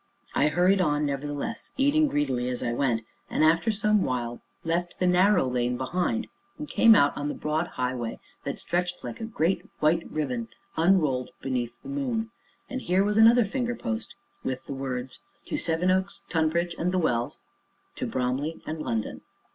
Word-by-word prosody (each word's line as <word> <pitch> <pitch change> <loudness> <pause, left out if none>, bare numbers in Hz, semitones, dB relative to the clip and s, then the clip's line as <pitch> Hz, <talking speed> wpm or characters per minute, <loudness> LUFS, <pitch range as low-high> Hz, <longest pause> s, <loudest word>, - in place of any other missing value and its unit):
I 145 - +3
hurried 180 +5 +3
on, 150 -3 +2
nevertheless, 145 +10 -4
eating 290 +3 +4
greedily 130 - 0
as 125 - -3
I 120 - 0
went, 120 -3 0 0.2
and, - - +1
after 165 +7 +4
some 210 -1 +2
while, 120 -2 -2 0.2
left 170 +2 -1
the 185 - +1
narrow 180 0 +4
lane 125 -1 0
behind, 180 - -1 0.3
and 300 - -6
came 230 -5 +6
out 145 -7 +4
on 145 - -3
the 150 - -3
broad 155 +3 -1
highway 125 -2 -2 0.2
that - - -3
stretched 180 0 -2
like 230 - -6
a - - -2
great, 185 -5 0 0.2
white 160 +2 +2
riband, 230 +10 -2 0.3
unrolled 160 -7 +3
beneath 125 -3 -2
the - - -8
moon. 245 -5 -2 0.4
And 260 0 -4
here 185 -1 +2
was 210 +1 +1
another 230 +1 +7
finger 245 +3 -2
post 110 - -4 0.3
with 130 0 -3
the - - -5
words 130 -1 -4 0.3
"To - - -3
Sevenoaks, 185 +4 +1
Tonbridge, 170 +1 +1
and 180 +2 +1
the 185 - +1
Wells. 120 -9 0 0.6
To - - -2
Bromley 130 +6 -1
and 155 0 -4
London." 110 -6 -2
165 Hz, 170 wpm, -27 LUFS, 130-200 Hz, 0.6 s, another